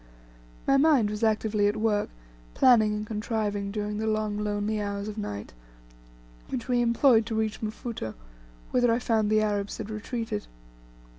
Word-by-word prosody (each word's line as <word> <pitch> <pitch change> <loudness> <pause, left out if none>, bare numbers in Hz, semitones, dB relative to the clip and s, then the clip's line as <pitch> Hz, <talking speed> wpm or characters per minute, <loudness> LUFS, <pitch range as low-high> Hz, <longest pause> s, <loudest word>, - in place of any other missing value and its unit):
My 275 - +4
mind 275 -8 +4
was 210 +2 -4
actively 215 -1 +2
at 205 - 0
work 215 -1 +1 0.5
planning 220 -4 +5
and 210 0 -3
contriving 210 -2 -2
during 210 0 -3
the 220 - -1
long 215 -1 0
lonely 210 0 -1
hours 200 0 -3
of 210 - -5
night, 105 - -5 1.0
which 255 -2 -4
we 245 -1 +2
employed 235 -1 +4
to 225 - -2
reach 220 -1 -1
Mfuto, 220 - -5 0.6
whither 245 -2 +3
I 230 - +3
found 220 -3 +1
the 215 0 +3
Arabs 205 -1 -1
had 220 -1 -6
retreated. 225 - -4
215 Hz, 155 wpm, -27 LUFS, 210-225 Hz, 1.0 s, planning